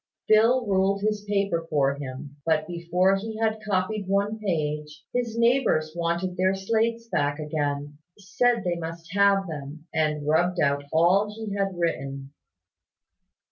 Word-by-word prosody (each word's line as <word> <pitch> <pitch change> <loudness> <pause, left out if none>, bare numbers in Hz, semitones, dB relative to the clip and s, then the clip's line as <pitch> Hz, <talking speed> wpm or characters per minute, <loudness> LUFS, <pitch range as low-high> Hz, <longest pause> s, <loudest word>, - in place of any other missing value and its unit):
Phil 230 +4 +4
ruled 195 0 +1
his 210 -1 0
paper 200 -5 0
for 140 -3 +2
him; 140 +1 -8
but 155 0 +1
before 175 +3 +1
he 220 +2 -6
had 220 -1 0
copied 200 0 -1
one 200 +3 0
page, 150 -6 -3
his 235 -2 -2
neighbours 235 -10 +2
wanted 170 +2 -1
their 185 +1 +2
slates 230 +4 0
back 145 -7 0
again, 145 -1 -3 0.2
said 215 +4 +1
they 175 -1 -1
must 165 +1 -7
have 200 -1 +4
them, 150 -1 -7
and 150 -2 0
rubbed 175 +4 +2
out 140 -1 +2
all 180 +6 +4
he 215 -1 -6
had 195 -2 -1
written. 140 -5 -3
180 Hz, 140 wpm, -25 LUFS, 155-205 Hz, 0.2 s, Phil